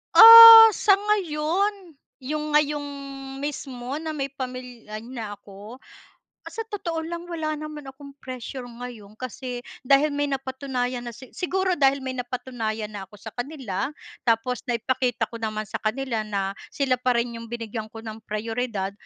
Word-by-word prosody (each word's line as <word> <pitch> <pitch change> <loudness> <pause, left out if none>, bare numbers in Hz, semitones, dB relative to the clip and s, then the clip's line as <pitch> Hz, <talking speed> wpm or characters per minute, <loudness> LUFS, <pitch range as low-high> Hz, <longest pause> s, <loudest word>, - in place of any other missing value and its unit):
Ah, 455 0 +12
sa 395 -1 +4
ngayon, 385 -2 -1 0.3
'yong 300 +2 -3
ngayong 295 -1 +1 0.6
mismo 270 -1 -5
na 315 -1 -5
may 275 -1 -3
pamilya 250 -5 -7
na 230 -4 -7
ako. 205 +5 -13 0.7
Sa - - -9
totoo 340 -6 -4
lang 340 0 -5
wala 315 -3 -3
naman 300 -2 -8
akong 280 +1 -11
pressure 255 0 -7
ngayon, 235 -4 -10
kasi 250 0 -6 0.2
dahil 280 +3 +3
may 290 0 -1
napatunayan 260 -2 -3
na - - -5
si 260 +1 -13
siguro 375 0 0
dahil 275 0 +3
may 260 - -3
napatunayan 235 -4 -4
na 195 -2 -8
ako 210 - -16
sa 220 0 -9
kanila. 245 -6 -4 0.4
Tapos 230 +2 +1
naipakita 245 +1 -1
ko 230 - -7
naman 215 -1 -3
sa - - -5
kanila 235 +1 -2
na 195 -2 -2 0.2
sila 270 -3 +1
pa 250 -1 +1
rin 235 0 -2
'yong 230 - -9
binigyan 225 -2 -5
ko 225 - -9
ng 220 0 -8
prayoridad. 215 -2 -3
255 Hz, 150 wpm, -24 LUFS, 230-300 Hz, 0.7 s, Ah